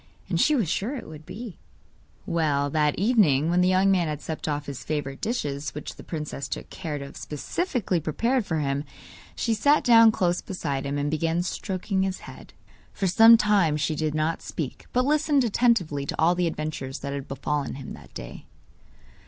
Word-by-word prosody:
And 170 -2 +1
she 305 - +4
was 225 - +1
sure 210 - -1
it 255 - -7
would 155 -1 -11
be! 210 -2 -8 0.7
Well, 145 -4 0
that 150 -1 +1
evening, 175 - +3
when 180 +1 +3
the 180 - +4
young 185 +1 +4
man 180 -3 +2
had 150 -2 -3
supped 160 0 -5
off 145 -1 -2
his 135 -3 -7
favourite 145 -3 -3
dishes 145 - -3
which 150 - -6
the - - -11
princess 150 -3 -5
took - - -6
care 160 -6 -4
to 140 - -6
have 140 - -11
specially 195 - -2
prepared 230 - 0
for 160 -5 -2
him, 140 -1 -1 0.5
she 230 - 0
sat 285 +7 +3
down 230 -2 +7
close 180 -4 0
beside 140 -7 -3
him, 140 +1 -2
and 145 +1 -1
began 165 +2 0
stroking 190 +1 -2
his 190 -1 -2
head. - - -12 0.4
For 195 - -3
some 225 +5 +8
time 200 -8 +3
she 155 +1 0
did 155 0 -2
not 155 +2 0
speak, 145 -6 -6
but 250 +1 +2
listened 295 -1 +3
attentively 200 - +1
to - - -4
all 165 +2 +5
the 180 -1 0
adventures 155 -4 -4
that 140 0 -4
had 140 -1 -5
befallen 140 0 -2
him 135 -1 -8
that 75 -3 -13
day. - - -9
165 Hz, 195 wpm, -26 LUFS, 145-205 Hz, 0.7 s, some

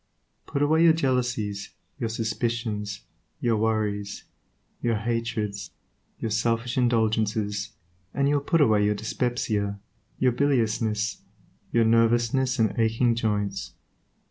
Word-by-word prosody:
Put 140 - 0
away 160 +3 +4
your 165 - +7
jealousies, 125 -9 -1 0.2
your 115 - -1
suspicions, 110 -2 -2 0.4
your 120 -2 +1
worries, 105 -2 -1 0.6
your 115 -1 +1
hatreds, 110 -2 -2 0.5
your 110 - -3
selfish 115 +2 0
indulgences, 110 -4 +1 0.4
and 140 +5 +1
you 145 - +2
will - - -1
put 165 +3 +2
away 110 -6 +4
your 105 0 +2
dyspepsia, 110 -2 -1 0.4
your 130 -1 +3
biliousness, 115 -5 0 0.5
your 115 -1 +3
nervousness 120 +3 +3
and 110 -3 +2
aching 115 +2 +3
joints. 105 -4 -2
115 Hz, 115 wpm, -26 LUFS, 105-120 Hz, 0.6 s, your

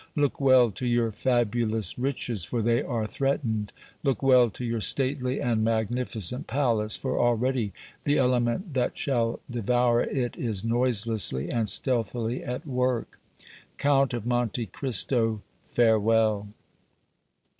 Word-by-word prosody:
Look 145 -2 0
well 130 -4 +5
to 125 +6 -4
your 120 -1 +1
fabulous 115 -2 -1
riches, 125 -6 -2
for 115 +5 -2
they 115 +1 +2
are 115 -4 -2
threatened; 110 -4 -2 0.3
look 135 -3 -1
well 125 -3 +5
to 120 +4 -7
your 115 -1 -2
stately 130 +1 0
and 115 -3 0
magnificent 115 0 -1
palace, 115 -6 +1
for - - -2
already 120 -2 +1 0.3
the 145 +1 +2
element 125 - 0
that 125 -2 -1
shall 115 -4 -1
devour 120 0 +1
it 125 -4 -2
is 110 -4 -2
noiselessly 115 - +1
and 115 -3 0
stealthily 120 +1 0
at 125 +1 -5
work! 125 -4 -2 0.6
Count 135 -3 +2
of 115 -2 -5
Monte 120 -1 -1
Cristo, 115 -1 0 0.2
farewell!" 110 -2 +2
120 Hz, 125 wpm, -26 LUFS, 110-130 Hz, 0.6 s, well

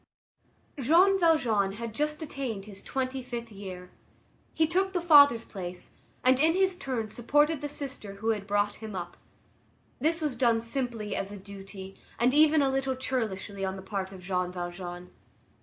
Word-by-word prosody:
Jean 355 +9 +5
Valjean 235 - +3
had 230 +1 -6
just 300 +5 -1
attained 255 -9 -4
his 200 -2 -8
twenty 265 0 -3
fifth 240 -2 -6
year. 185 -3 -8 0.6
He 320 - +2
took 380 +4 0
the 360 - +1
father's 285 -8 +7
place, 180 -2 -7 0.3
and, 255 0 +4
in 320 +3 +4
his 380 -1 +3
turn, 255 -9 -3
supported 295 +7 +2
the 290 - -3
sister 270 -8 -6
who 220 +3 -2
had 210 -3 -1
brought 205 0 +1
him 215 -2 -7
up. 175 -1 -5 0.8
This 320 +5 +2
was 300 -5 -1
done 235 -2 +3
simply 230 -2 -3
as 195 +1 -2
a 205 - -7
duty 195 0 -10 0.2
and 245 +2 +3
even 305 0 +5
a 270 - +2
little 270 0 0
churlishly 210 -6 -3
on 190 0 -1
the 190 - -9
part 190 -1 -4
of 185 -2 -11
Jean 180 -1 -1
Valjean. 175 0 -6
230 Hz, 170 wpm, -28 LUFS, 195-285 Hz, 0.8 s, father's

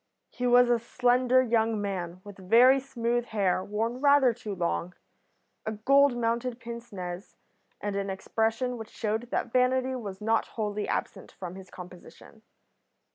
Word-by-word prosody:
He 250 - -2
was 245 0 +5
a 240 - +3
slender 250 +2 +2
young 225 -2 +1
man, 185 -3 -4
with 205 -1 -11
very 250 +4 +7
smooth 240 -3 -2
hair 195 -5 0
worn 225 +5 -3
rather 280 -4 +5
too 215 -3 -6
long, 175 0 -2 0.7
a 220 - -3
gold 275 +4 +3
mounted 235 +1 -1
pince 235 0 -8
nez, 180 -1 -7 0.4
and 205 -1 -3
an 200 0 -2
expression 225 +5 -1
which 225 0 -8
showed 225 +2 -3
that 235 - -2
vanity 255 +1 +2
was 200 -6 -6
not 225 +1 +1
wholly 210 -1 -2
absent - - -4
from 180 -2 -7
his 190 0 -11
composition. 180 +4 -13
230 Hz, 150 wpm, -28 LUFS, 205-245 Hz, 0.7 s, very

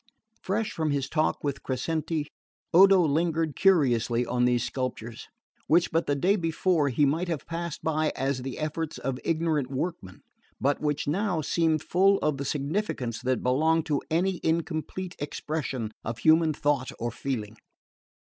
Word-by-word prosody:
Fresh 210 +3 -1
from 160 -1 -1
his 140 -2 0
talk 155 -1 0
with 140 -2 -2
Crescenti, 155 +4 -2 0.5
Odo 195 +2 +7
lingered 160 0 +1
curiously 125 - +3
on 125 0 +1
these 120 -1 +2
sculptures, 120 -3 -4 0.4
which 170 +2 +3
but 165 +1 0
the 145 - +2
day 185 +8 +2
before 165 -3 +1
he 140 +3 +2
might 160 +6 0
have 165 -5 -3
passed 170 -1 -5
by 155 -1 +1
as 135 -1 -1
the 130 0 -5
efforts 155 +1 -3
of 130 -1 -3
ignorant 160 -5 0
workmen, 130 - -5 0.4
but 140 +1 +1
which 150 -2 -1
now 180 +2 0
seemed 155 0 +1
full 195 +4 +3
of 150 -2 +1
the 140 - -4
significance 140 - -2
that 130 0 -1
belongs 160 +6 +2
to 150 -3 -1
any 175 +2 +1
incomplete 170 +2 -2
expression 145 -6 -3
of 115 +1 -4
human 160 +5 +4
thought 145 -3 0
or 120 +1 -3
feeling. 110 -4 -4
155 Hz, 155 wpm, -27 LUFS, 135-165 Hz, 0.5 s, Odo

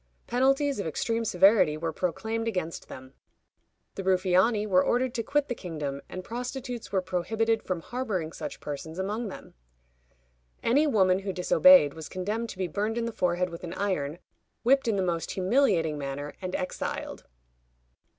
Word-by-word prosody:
Penalties 270 +2 +2
of 200 - -2
extreme 230 +8 -1
severity 185 -5 +4
were 165 0 -3
proclaimed 220 +7 -2
against 180 -7 -3
them. 130 0 -11 0.8
The - - -5
Ruffiani 190 +3 +3
were 185 -3 +4
ordered 250 0 +1
to 240 - -1
quit 285 +5 0
the 245 - -2
kingdom, 150 - -5
and 185 - -6
prostitutes 245 +2 -5
were 190 -2 +1
prohibited 220 +5 0
from 180 -3 -3
harboring 205 -8 -3
such 150 -2 -6
persons 155 +3 -6
among 210 +5 -2
them. 195 - -10 1.1
Any 285 +6 +3
woman 190 -8 +3
who 195 0 -3
disobeyed 180 - +6
was 160 -1 -8
condemned 210 +5 -3
to - - -8
be 185 -1 -1
burned 210 +7 -2
in 235 - 0
the 230 - -2
forehead 180 -1 0
with 170 - -9
an 175 - -5
iron, 170 -7 -1 0.5
whipped 270 +1 +4
in 225 - +2
the 190 - +1
most 170 -2 -1
humiliating 185 - +2
manner, 140 +1 -5
and 185 -1 -3
exiled. 185 - -4
190 Hz, 160 wpm, -28 LUFS, 170-230 Hz, 1.1 s, disobeyed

